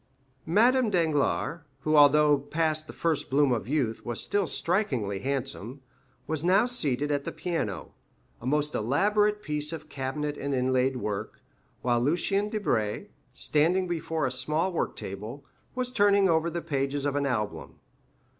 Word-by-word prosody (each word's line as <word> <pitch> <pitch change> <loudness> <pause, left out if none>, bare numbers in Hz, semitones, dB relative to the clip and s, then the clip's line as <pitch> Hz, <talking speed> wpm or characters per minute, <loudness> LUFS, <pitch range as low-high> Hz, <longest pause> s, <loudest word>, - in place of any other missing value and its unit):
Madame 235 +7 +4
Danglars 165 -2 +1 0.2
(who, 155 0 +1
although 150 0 +6
past 155 +2 -1
the - - -7
first 165 -3 -1
bloom 140 0 +3
of 115 -4 -1
youth, 130 -6 -1
was 120 -1 -4
still 200 -3 0
strikingly 130 - 0
handsome) 135 0 -4 0.4
was 155 0 -3
now 190 +6 +4
seated 145 - +1
at 145 -1 0
the - - -4
piano, 135 - -3 0.5
a 120 - -6
most 150 +2 +1
elaborate 210 - +1
piece 150 0 -3
of 155 -2 -7
cabinet 145 +2 -3
and 140 0 -2
inlaid 130 +1 +1
work, 105 -5 -4 0.4
while 120 -1 +2
Lucien 195 +9 +1
Debray, 120 - -1 0.2
standing 175 +5 +2
before 165 -3 -2
a 130 - -1
small 155 +7 -1
work - - -1
table, 105 +8 -7 0.3
was 250 -1 -2
turning 200 -4 +4
over 165 -1 +2
the 170 0 -4
pages 140 0 -2
of 145 -1 0
an 140 -1 +1
album. 105 - -3
150 Hz, 150 wpm, -27 LUFS, 130-170 Hz, 0.5 s, although